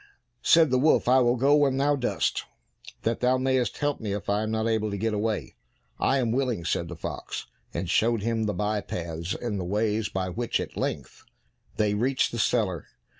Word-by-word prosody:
Said 165 Hz, -4 st, +5 dB
the 130 Hz, -, +3 dB
wolf, 155 Hz, -1 st, +3 dB
"I 130 Hz, +1 st, +6 dB
will 120 Hz, -1 st, +3 dB
go 135 Hz, +4 st, +4 dB
when 140 Hz, -3 st, +3 dB
thou 145 Hz, +1 st, +3 dB
dost, 130 Hz, -3 st, -1 dB, 0.6 s
that 115 Hz, 0 st, 0 dB
thou 125 Hz, +1 st, +3 dB
mayest 130 Hz, -3 st, 0 dB
help 145 Hz, -1 st, -1 dB
me 105 Hz, -3 st, -3 dB
if 100 Hz, 0 st, -3 dB
I 105 Hz, +1 st, +1 dB
am 110 Hz, -, -2 dB
not 110 Hz, 0 st, 0 dB
able 110 Hz, -1 st, 0 dB
to 100 Hz, -, -3 dB
get 110 Hz, +2 st, -1 dB
away." 105 Hz, +1 st, -2 dB, 0.5 s
"I 135 Hz, -, +2 dB
am 120 Hz, -4 st, +1 dB
willing," 125 Hz, -8 st, -1 dB
said 85 Hz, +1 st, -1 dB
the 85 Hz, -, -7 dB
fox, 80 Hz, -, -5 dB, 0.3 s
and 95 Hz, -, -3 dB
showed 115 Hz, +4 st, +2 dB
him 115 Hz, -1 st, 0 dB
the 105 Hz, -, -1 dB
by 105 Hz, +2 st, 0 dB
paths 85 Hz, -1 st, -4 dB
and 105 Hz, -5 st, -3 dB
ways 105 Hz, +1 st, 0 dB
by 95 Hz, -1 st, -2 dB
which 115 Hz, +6 st, -1 dB
at -, -, -5 dB
length -, -, -4 dB, 0.5 s
they 105 Hz, -1 st, +1 dB
reached 130 Hz, +6 st, +1 dB
the 120 Hz, -, -4 dB
cellar. 105 Hz, -7 st, 0 dB
110 Hz, 200 wpm, -26 LUFS, 105-130 Hz, 0.6 s, I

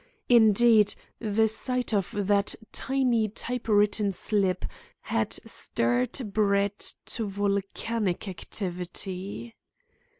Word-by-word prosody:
Indeed, 220 Hz, -2 st, +5 dB, 0.2 s
the 220 Hz, 0 st, +2 dB
sight 250 Hz, +2 st, -1 dB
of 195 Hz, -3 st, +1 dB
that 200 Hz, 0 st, +2 dB, 0.2 s
tiny 250 Hz, -5 st, +1 dB
type 245 Hz, +3 st, -4 dB
written 205 Hz, -1 st, +3 dB
slip 190 Hz, -1 st, 0 dB, 0.4 s
had -, -, -1 dB
stirred 125 Hz, -, 0 dB
Brett 200 Hz, -1 st, +2 dB
to 225 Hz, -3 st, -3 dB
volcanic 200 Hz, +1 st, -2 dB
activity. 190 Hz, +3 st, -5 dB
205 Hz, 90 wpm, -27 LUFS, 195-225 Hz, 0.4 s, Indeed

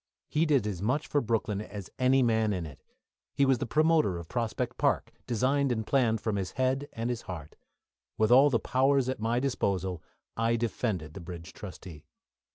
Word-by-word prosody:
He 160 Hz, +2 st, +2 dB
did 140 Hz, -7 st, +3 dB
as 100 Hz, -4 st, -3 dB
much 130 Hz, +9 st, 0 dB
for 145 Hz, -, +1 dB
Brooklyn 110 Hz, -3 st, -1 dB
as 100 Hz, -3 st, -8 dB
any 130 Hz, +1 st, +4 dB
man 110 Hz, -3 st, +2 dB
in 90 Hz, -3 st, -3 dB
it. 75 Hz, -4 st, -11 dB, 0.5 s
He 140 Hz, -, +4 dB
was 135 Hz, -3 st, +3 dB
the -, -, -2 dB
promoter 155 Hz, -, +3 dB
of 85 Hz, -1 st, -8 dB
Prospect 115 Hz, +1 st, -2 dB
Park, -, -, +1 dB
designed 130 Hz, +3 st, +1 dB
and 110 Hz, -2 st, -1 dB
planned 115 Hz, -4 st, +2 dB
from 110 Hz, -2 st, -1 dB
his 95 Hz, -2 st, -3 dB
head 130 Hz, +2 st, 0 dB
and 115 Hz, +1 st, -2 dB
heart. 80 Hz, -8 st, -8 dB, 0.6 s
With 110 Hz, +1 st, +2 dB
all 135 Hz, +4 st, +7 dB
the 125 Hz, -, +2 dB
powers 135 Hz, +1 st, +2 dB
at 130 Hz, -, -2 dB
my 115 Hz, +2 st, +1 dB
disposal 95 Hz, -, -1 dB, 0.3 s
I 115 Hz, +1 st, +1 dB
defended 105 Hz, -8 st, -2 dB
the 95 Hz, -, -8 dB
bridge 85 Hz, 0 st, -9 dB
trustee. 90 Hz, -6 st, -10 dB
115 Hz, 180 wpm, -29 LUFS, 100-130 Hz, 0.6 s, all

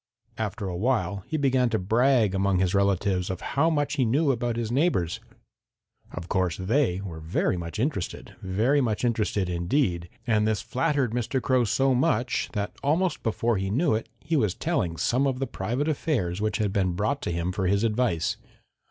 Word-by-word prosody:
After 105 Hz, -1 st, -3 dB
a 90 Hz, -, -3 dB
while 100 Hz, -3 st, 0 dB
he 155 Hz, -, -1 dB
began 130 Hz, -3 st, +2 dB
to 115 Hz, -, +1 dB
brag 115 Hz, +2 st, +3 dB
among 95 Hz, 0 st, +1 dB
his 90 Hz, 0 st, +1 dB
relatives 100 Hz, -2 st, +1 dB
of 95 Hz, -1 st, -4 dB
how 160 Hz, +4 st, +3 dB
much 145 Hz, -1 st, 0 dB
he 130 Hz, -, +3 dB
knew 140 Hz, +6 st, +2 dB
about 120 Hz, -2 st, -1 dB
his 115 Hz, -1 st, -2 dB
neighbors. 125 Hz, -, +1 dB, 0.9 s
Of 85 Hz, 0 st, -7 dB
course 90 Hz, -4 st, 0 dB
they 95 Hz, -1 st, +1 dB
were 85 Hz, -5 st, -7 dB
very 80 Hz, +3 st, 0 dB
much 85 Hz, +2 st, -5 dB
interested, 115 Hz, -, -3 dB
very 110 Hz, +10 st, +2 dB
much 115 Hz, -1 st, 0 dB
interested 105 Hz, -5 st, 0 dB
indeed, 85 Hz, -, 0 dB, 0.2 s
and 110 Hz, -3 st, +2 dB
this 110 Hz, -2 st, 0 dB
flattered 140 Hz, -3 st, 0 dB
Mr. 120 Hz, +3 st, -1 dB
Crow 130 Hz, -1 st, +2 dB
so 135 Hz, +4 st, +2 dB, 0.6 s
that 105 Hz, -2 st, -2 dB
almost 165 Hz, +6 st, +1 dB
before 115 Hz, 0 st, 0 dB
he 95 Hz, 0 st, -2 dB
knew 135 Hz, -, +2 dB
it 110 Hz, +1 st, -2 dB
he 165 Hz, +2 st, -2 dB
was 105 Hz, -, +1 dB
telling 85 Hz, -2 st, -1 dB
some 130 Hz, -, +1 dB
of 130 Hz, -2 st, -1 dB
the 135 Hz, -, -1 dB
private 125 Hz, +7 st, -2 dB
affairs 115 Hz, -, -1 dB
which 105 Hz, 0 st, 0 dB
had 105 Hz, -3 st, -1 dB
been 95 Hz, -3 st, +1 dB
brought 105 Hz, +10 st, -1 dB
to -, -, -2 dB
him 85 Hz, +2 st, -1 dB
for 95 Hz, -1 st, -1 dB
his 100 Hz, +3 st, +2 dB
advice. 110 Hz, -7 st, 0 dB
110 Hz, 185 wpm, -26 LUFS, 95-130 Hz, 0.9 s, brag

